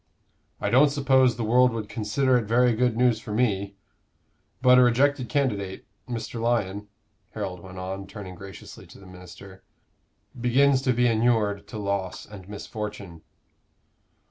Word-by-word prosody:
"I 100 - -2
don't 135 +5 +6
suppose 130 -3 +3
the 120 - -4
world 125 +3 +4
would 110 -2 -4
consider 120 +5 0
it 120 -3 +1
very 120 +3 +3
good 120 0 0
news 120 -3 +3
for 110 -1 -9
me; 100 -3 0 0.8
but 125 -1 +6
a - - +7
rejected 130 +1 +2
candidate, 105 -10 -2 0.2
Mr. 115 -1 -5
Lyon," 105 -4 -1 0.5
Harold 90 -1 -4
went 95 +1 -12
on, 95 +1 -6
turning 100 -4 -9
graciously 95 +1 -11
to - - -15
the 100 - -15
minister, 90 +1 -13 0.7
"begins 130 +2 +3
to 130 - +3
be 125 +1 +2
inured 110 -3 +1
to 105 - -8
loss 100 -3 -3
and 100 -2 -12
misfortune." 105 -4 -7
110 Hz, 145 wpm, -25 LUFS, 100-125 Hz, 0.8 s, a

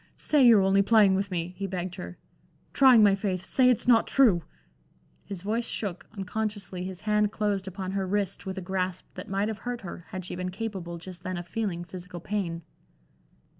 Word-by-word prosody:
"Say 295 -3 +3
you're 220 -5 +7
only 195 +1 +4
playing 205 -2 +5
with 195 +1 0
me," 175 -1 -3
he 195 +1 -3
begged 185 -1 -4
her, 180 -1 -8 0.6
"trying 255 -5 +7
my 205 -1 +6
faith 195 -2 -2
say 255 +4 +4
it's 245 -1 +1
not 235 -2 +5
true." 225 -11 +4 0.8
His 195 -3 -7
voice 225 +3 -1
shook, 195 -5 -4
unconsciously 195 -2 -3
his 185 -1 -6
hand 210 -1 +2
closed 205 -3 -1
upon 190 0 -5
her 195 -1 -2
wrist 200 0 -2
with 190 0 -4
a - - -3
grasp 185 -1 -2
that - - -8
might 195 +2 0
have 220 -1 -4
hurt 245 -1 -4
her, 175 -3 -8
had 185 -1 -6
she - - -5
been 180 0 -3
capable 190 -4 -5
just 180 +1 -9
then 185 -1 -4
of 175 0 -6
feeling 195 -6 -3
physical 180 0 -8
pain. 170 -3 -3
195 Hz, 195 wpm, -27 LUFS, 180-210 Hz, 0.8 s, you're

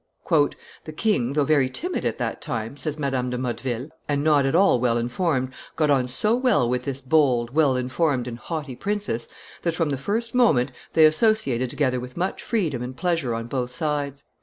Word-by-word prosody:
"The 155 - -7
king, 140 - +1
though 145 0 +2
very 140 -3 +3
timid 355 - -3
at - - -1
that - - -3
time," 115 +2 -4
says 145 +2 -4
Madame 135 -4 -1
de 125 - -2
Motteville, 125 +2 -3 0.2
"and 145 -1 +1
not 145 -3 +4
at 135 - +1
all 185 -8 +5
well 120 -1 +2
informed, 130 +2 -1 0.2
got 155 -2 +2
on 130 -3 +2
so 210 - +1
well 250 - +2
with 125 +1 -1
this 135 -1 -3
bold, 130 -4 +2
well 145 -4 +3
informed, 125 0 0
and 120 -1 -6
haughty 150 -3 -5
princess, 200 - -2 0.3
that, 170 -2 -1
from 165 -2 0
the 135 - -1
first 220 - -2
moment, 150 - +3 0.2
they 160 - +7
associated 155 - +2
together 130 -2 0
with 125 +3 -9
much 185 +2 -2
freedom 165 - -1
and 125 +1 -6
pleasure 165 -10 0
on 115 0 -4
both 125 0 -2
sides. 145 -1 -3
140 Hz, 190 wpm, -24 LUFS, 125-160 Hz, 0.3 s, they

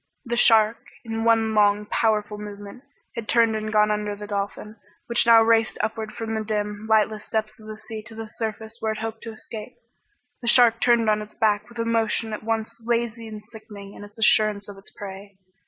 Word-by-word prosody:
The 235 0 -2
shark, 225 -1 +5 0.3
in 225 0 -3
one 225 -1 +3
long 210 0 +3
powerful 210 -1 0
movement, 205 +3 -9 0.3
had 225 -2 -6
turned 230 -2 +3
and 215 0 -3
gone 210 0 +3
under 210 -1 -2
the 210 0 -8
dolphin, 205 +1 -4 0.3
which 235 0 +2
now 230 -1 +8
raced 225 0 +2
upward 220 0 -3
from 225 -1 -4
the 220 0 -2
dim, 210 0 -3
lightless 215 -1 +1
depths 215 0 -2
of 215 - -14
the 215 0 -7
sea 220 0 -8
to 225 - -10
the 225 0 -6
surface 220 0 -5
where 220 0 -1
it - - -8
hoped 225 0 -5
to 225 - -5
escape. 220 +2 -9 0.7
The 240 - -6
shark 235 -2 +5
turned 235 -2 +3
on 215 0 +2
its 210 0 -11
back 210 0 +1
with 235 - -14
a 230 - -1
motion 225 -1 0
at 215 - -5
once 225 +1 -3
lazy 230 -1 -1
and 215 -1 -9
sickening 205 -2 -12
in - - -11
its 205 +1 -13
assurance 215 -2 +3
of 205 - -9
its 195 - -11
prey. 200 -1 -10
220 Hz, 205 wpm, -24 LUFS, 210-225 Hz, 0.7 s, now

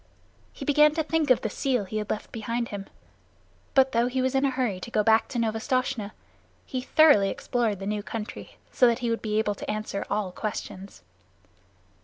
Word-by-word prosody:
He - - -8
began 300 +1 +5
to 320 - +1
think 315 -1 0
of 255 - +5
the 220 - -2
seal 255 -5 0
he 215 +3 -4
had 210 -1 -3
left 215 - -4
behind 230 +1 -3
him, 200 -1 -6 0.9
but 265 -1 +5
though 235 0 +2
he 255 +1 -2
was 260 +1 +1
in 270 0 +2
a - - +3
hurry 250 -8 -1
to 210 - -7
go 215 -2 +1
back 220 0 +4
to - - -5
Novastoshnah, 225 -1 -1 0.5
he 255 - -3
thoroughly 260 -9 +5
explored 230 -3 -1
the 195 - -7
new 210 +1 -2
country, 215 +1 -7 0.2
so 250 - +5
that 235 -1 +2
he 230 - +1
would 230 - -1
be 215 -1 -1
able 215 -1 +1
to - - -8
answer 215 -2 -3
all 205 -3 -1
questions. 200 -1 -6
230 Hz, 200 wpm, -26 LUFS, 210-255 Hz, 0.9 s, began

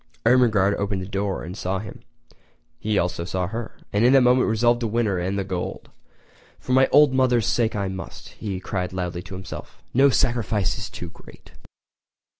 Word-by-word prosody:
Ermengarde 110 -5 +4
opened 100 -2 -2
the - - -7
door 100 0 -2
and 90 +3 -7
saw 95 -1 -2
him. 100 +1 -8 0.8
He 105 -1 0
also 85 -1 -1
saw 90 +1 -2
her, 115 +5 -6 0.2
and 105 +2 +2
in 125 +2 +6
that 135 - +7
moment 125 +1 +4
resolved 120 +2 +2
to 120 - -1
win 115 +2 0
her 95 -4 0
and 95 +3 -2
the 100 - 0
gold. 95 -2 -5 0.7
"For - - -7
my 130 +1 +5
old 145 -2 +5
mother's 125 -3 +3
sake 115 -2 +1
I 100 -2 -1
must"—he 95 +1 -6
cried 90 -1 -3
loudly 90 -1 -3
to 95 - -9
himself. 95 -1 -9
"No 135 +3 +5
sacrifice 115 -6 +1
is - - -5
too - - -8
great!" - - -16
105 Hz, 185 wpm, -23 LUFS, 95-120 Hz, 0.8 s, that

